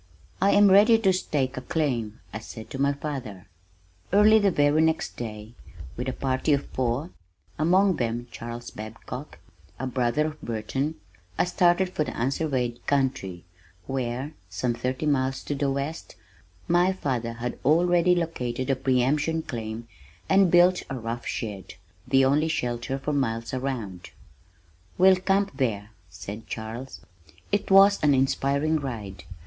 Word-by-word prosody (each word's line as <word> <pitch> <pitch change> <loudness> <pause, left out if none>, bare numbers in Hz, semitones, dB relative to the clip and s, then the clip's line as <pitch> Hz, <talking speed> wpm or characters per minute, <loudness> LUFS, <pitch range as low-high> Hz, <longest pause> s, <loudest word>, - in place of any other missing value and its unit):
"I 195 - +4
am 205 -1 +6
ready 210 +4 +7
to 195 -4 +3
stake 140 -7 -1
a - - -3
claim," 120 -9 -2
I 105 - -4
said 110 0 -10
to 135 - -4
my 140 0 +3
father. 135 -10 -6 0.7
Early 210 +3 +6
the 205 -1 +3
very 145 -2 +3
next 160 0 0
day, 110 -1 -7 0.4
with 125 +2 -3
a - - -3
party 130 +2 0
of 140 - 0
four 130 +7 -2 0.5
(among 185 +3 +3
them 120 0 -2
Charles 120 +1 -7
Babcock, 115 +6 -8 0.4
a 130 - -2
brother 130 +3 0
of 155 0 -6
Burton), 130 +7 -3 0.4
I - - +3
started 180 +1 +3
for 155 - -1
the - - -6
unsurveyed 130 -2 -1
country 125 -11 -1 0.4
where, 130 +3 -3 0.2
some 120 +7 -1
thirty 125 +4 -3
miles 135 -2 0
to - - -3
the 140 0 0
west, 140 +4 -4 0.5
my 175 +2 +3
father 125 -9 -2
had 120 +1 -5
already 175 +3 +4
located 130 -7 -2
a - - +2
pre 130 -1 +1
emption 150 +4 0
claim 115 -2 -6 0.4
and 190 -1 +5
built 175 +1 +5
a 135 - -3
rough 115 0 -5
shed, 100 -6 -5 0.3
the 135 -1 +4
only 145 +4 +3
shelter 125 -3 -2
for 150 +2 -3
miles 115 -4 -1
around. 115 -9 -4 0.9
"We'll 185 +1 +6
camp 195 +2 0
there," 110 -5 -1 0.2
said 100 +6 -8
Charles. 115 +4 -7 0.5
It 205 0 0
was 195 +1 +6
an 145 -2 +4
inspiring 140 +3 +1
ride! 105 -9 -6
135 Hz, 150 wpm, -26 LUFS, 120-160 Hz, 0.9 s, ready